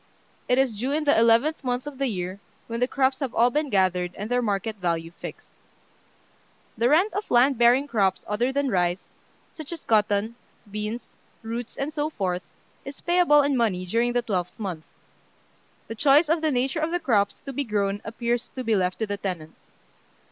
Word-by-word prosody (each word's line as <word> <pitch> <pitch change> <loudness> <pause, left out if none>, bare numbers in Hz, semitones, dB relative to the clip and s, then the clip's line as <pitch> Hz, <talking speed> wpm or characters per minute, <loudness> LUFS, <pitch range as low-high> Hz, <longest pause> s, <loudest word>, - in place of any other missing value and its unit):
It 250 - +3
is 255 -6 +1
due 255 +4 -1
in 310 +1 0
the 290 - +4
eleventh 230 +8 +3
month 250 0 -2
of 290 -2 -8
the 275 - +1
year, 185 -3 -4 0.3
when 230 0 -4
the 250 - +2
crops 265 0 +1
have 270 -4 -4
all 240 +2 +4
been 300 +2 0
gathered, 180 -4 +1
and 210 +4 -6
their 245 0 +2
market 210 0 -2
value 170 -3 -2
fixed. - - -10 1.2
The 235 +2 +2
rent 350 +8 +3
of 415 +2 -4
land 250 +1 +4
bearing 245 +4 +5
crops 195 -7 0
other 235 +5 0
than 280 -1 0
rice, 180 -1 +1 0.5
such 315 -1 -9
as 335 -3 -7
cotton, 215 +1 +1 0.3
beans, 210 +3 -5 0.3
roots, 230 +1 -5
and 285 +3 -3
so 300 0 -1
forth, 185 - -2 0.4
is 275 +1 -9
payable 345 -5 +4
in 280 -1 +1
money 205 -7 0
during 235 +6 +1
the 245 0 +1
twelfth 180 -6 -3
month. 180 -7 -5 1.0
The - - -6
choice 285 +6 +4
of 325 0 +2
the 315 - +2
nature 265 +3 0
of 315 +1 0
the 350 +1 -1
crops 205 - +1
to 275 - -6
be 285 - -1
grown 205 -3 -1
appears 235 +2 -2
to 260 - -4
be 225 -2 +1
left 185 -2 0
to 220 - -1
the 205 -1 -3
tenant. 175 -6 -5
235 Hz, 190 wpm, -25 LUFS, 200-275 Hz, 1.2 s, bearing